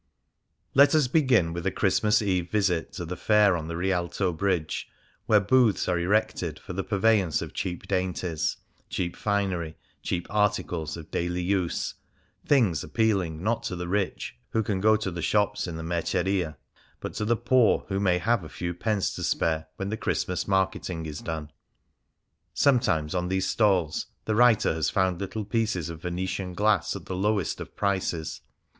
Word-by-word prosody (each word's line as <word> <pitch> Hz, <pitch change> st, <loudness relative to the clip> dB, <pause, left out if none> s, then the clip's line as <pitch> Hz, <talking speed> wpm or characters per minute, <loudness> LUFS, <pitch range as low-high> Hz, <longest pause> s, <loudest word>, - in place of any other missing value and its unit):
Let 140 Hz, +3 st, +6 dB
us 150 Hz, -5 st, +4 dB
begin 125 Hz, -, +3 dB
with 85 Hz, 0 st, -4 dB
a -, -, +1 dB
Christmas 105 Hz, +3 st, +2 dB
Eve 90 Hz, -4 st, 0 dB
visit 95 Hz, -6 st, 0 dB
to 85 Hz, -, -5 dB
the 90 Hz, +2 st, -4 dB
fair 105 Hz, -2 st, +4 dB
on 80 Hz, -2 st, -4 dB
the 85 Hz, 0 st, -4 dB
Rial 90 Hz, -1 st, 0 dB
to 95 Hz, -2 st, 0 dB
Bridge, 85 Hz, -2 st, -1 dB, 0.4 s
where 105 Hz, -, +6 dB
booths 110 Hz, +1 st, +3 dB
are 90 Hz, -1 st, +1 dB
erected 90 Hz, -4 st, 0 dB
for 90 Hz, -, -8 dB
the 95 Hz, +2 st, -2 dB
purveyance 100 Hz, -5 st, +2 dB
of -, -, -8 dB
cheap 90 Hz, -2 st, -4 dB
dainties, 90 Hz, -3 st, -1 dB, 0.3 s
cheap 85 Hz, -1 st, -2 dB
finery, 95 Hz, -6 st, -1 dB, 0.2 s
cheap 85 Hz, -1 st, -2 dB
articles 100 Hz, -7 st, 0 dB
of 80 Hz, -, -11 dB
daily 90 Hz, +1 st, -1 dB
use 90 Hz, -2 st, -1 dB, 0.3 s
— -, -, -38 dB
things 110 Hz, -, +3 dB
appealing 90 Hz, -1 st, 0 dB
not 115 Hz, +2 st, +1 dB
to 115 Hz, -5 st, -4 dB
the 90 Hz, 0 st, -4 dB
rich, 95 Hz, -7 st, -2 dB
who 110 Hz, -, 0 dB
can 100 Hz, -2 st, -1 dB
go 110 Hz, +1 st, +5 dB
to 105 Hz, -3 st, -2 dB
the 85 Hz, 0 st, -5 dB
shops 105 Hz, +1 st, +1 dB
in 85 Hz, -, -5 dB
the 80 Hz, -, -5 dB
Merceria, 85 Hz, -1 st, -1 dB, 0.4 s
but -, -, -6 dB
to 105 Hz, -, -3 dB
the 115 Hz, +2 st, +2 dB
poor 120 Hz, 0 st, +3 dB
who 95 Hz, 0 st, 0 dB
may 90 Hz, -3 st, +3 dB
have 105 Hz, +3 st, +1 dB
a 80 Hz, -, -9 dB
few 85 Hz, +3 st, -4 dB
pence 105 Hz, +2 st, -1 dB
to -, -, -6 dB
spare 80 Hz, -1 st, 0 dB
when 95 Hz, 0 st, -4 dB
the 110 Hz, -, -2 dB
Christ 110 Hz, -1 st, -1 dB
mas 90 Hz, -, -2 dB
marketing 95 Hz, -3 st, 0 dB
is 75 Hz, -1 st, -5 dB
done. 80 Hz, -2 st, -5 dB, 1.0 s
Sometimes 95 Hz, -, +2 dB
on 90 Hz, -1 st, -1 dB
these 95 Hz, +1 st, 0 dB
stalls 95 Hz, -8 st, +1 dB, 0.2 s
the 110 Hz, -, 0 dB
writer 115 Hz, -4 st, +4 dB
has 80 Hz, -1 st, 0 dB
found 95 Hz, -2 st, +1 dB
little 105 Hz, +2 st, -4 dB
pieces 105 Hz, -6 st, -1 dB
of 80 Hz, -2 st, -9 dB
Vene 90 Hz, +1 st, -2 dB
tian 95 Hz, -1 st, -4 dB
glass 105 Hz, -2 st, +2 dB
at -, -, -8 dB
the 95 Hz, -, -4 dB
lowest 100 Hz, 0 st, 0 dB
of -, -, -9 dB
prices. 95 Hz, -5 st, -1 dB
95 Hz, 180 wpm, -27 LUFS, 85-105 Hz, 1.0 s, Let